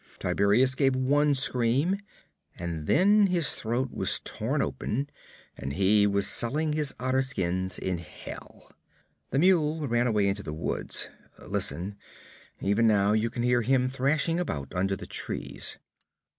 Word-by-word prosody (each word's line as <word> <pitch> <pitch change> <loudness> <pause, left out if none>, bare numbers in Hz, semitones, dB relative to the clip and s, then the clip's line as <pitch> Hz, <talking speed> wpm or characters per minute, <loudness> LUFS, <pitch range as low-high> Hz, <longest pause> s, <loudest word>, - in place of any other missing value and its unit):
'Tiberias 110 +6 +2
gave 135 -1 +1
one 145 +3 +2
scream, 135 +8 +2 0.6
and 85 -3 -5
then 200 +4 +4
his 175 -5 +3
throat 120 +3 -2
was - - +2
torn - - -3
open 135 +6 -2 0.5
and 70 +1 -6
he 100 +3 +3
was 100 0 +2
selling 150 +6 +2
his 150 -2 -1
otter 130 +1 0
skins 95 -7 -2
in 90 -2 -3
Hell. 80 -3 -12 0.6
The 135 - -2
mule 160 -3 +2
ran 120 0 +1
away 105 -4 +1
into 100 +1 -2
the 75 -5 -7
woods. 80 - -1 0.4
Listen! 100 +4 0 0.6
Even 105 +4 +2
now 100 -2 +3
you 110 +2 +1
can 120 +1 -4
hear 120 0 +2
him 125 +1 +1
thrashing 145 +6 0
about 70 - -4
under 95 +2 -1
the - - -9
trees. - - -1
120 Hz, 145 wpm, -27 LUFS, 100-140 Hz, 0.6 s, then